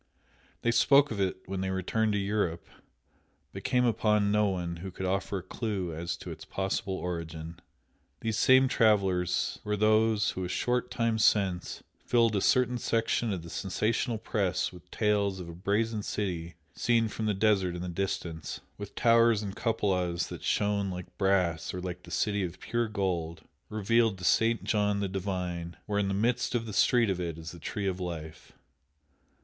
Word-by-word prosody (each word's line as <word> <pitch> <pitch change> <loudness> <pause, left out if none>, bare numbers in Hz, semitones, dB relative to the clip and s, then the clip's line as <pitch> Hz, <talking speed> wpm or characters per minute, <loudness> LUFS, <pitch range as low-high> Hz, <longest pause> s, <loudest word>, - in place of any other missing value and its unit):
They 120 - +3
spoke 140 +4 +5
of 100 -3 -2
it 95 -1 -1
when 95 0 -4
they 95 - -1
returned 105 +4 0
to - - +1
Europe, 100 -4 -1 0.9
but - - -7
came 125 0 +2
upon 105 -3 +2
no 105 0 +3
one 90 -3 -2
who 95 +3 -6
could 95 +1 -5
offer 95 +1 -1
a 90 - -6
clue 95 -4 -3
to 85 +1 -5
its - - -8
possible 95 +1 -2
origin. 85 -2 -5 0.6
These 110 -1 -1
same 130 +2 +6
travellers 95 -7 +2
were 105 0 -1
those 110 0 +3
who 95 - -4
a - - -2
short 125 +7 0
time 115 -1 0
since 95 -5 +1 0.2
filled 115 -3 +2
a 100 - +1
certain 125 +2 +3
section 115 0 0
of 90 -4 -3
the 85 - -9
sensational 110 +4 -1
press 95 -4 -1
with 90 0 -14
tales 100 -2 +1
of 90 - -7
a 85 - -8
"Brazen 105 +5 0
City" 85 -6 -3 0.2
seen 115 -2 +2
from 110 0 -3
the 105 - +1
desert 95 -3 +2
in 90 - -5
the - - -4
distance, 85 -3 -3 0.2
with 100 -1 -8
towers 115 -2 +4
and 100 -1 -5
cupolas 90 -6 0
that - - -7
shone 100 -1 +1
like 90 -1 -7
brass 90 -4 +1
or - - -3
like 90 0 -5
"the 90 - -14
city 105 +4 0
of 90 -1 -5
pure 120 0 -1
gold," 90 -6 -2 0.3
revealed 110 0 +2
to 90 - -11
St. 115 +5 +3
John 105 -1 +1
the 100 - 0
Divine, 90 -3 -4
where 105 -1 0
"in 100 - +1
the 95 - -1
midst 120 +4 +1
of 115 -1 0
the 110 - -6
street 115 +1 +4
of 90 -1 -2
it" 85 -2 -3
is 80 0 -7
the 85 - -11
Tree 100 +5 -4
of 95 -1 -1
Life. 80 -3 -6
100 Hz, 180 wpm, -29 LUFS, 90-110 Hz, 0.9 s, same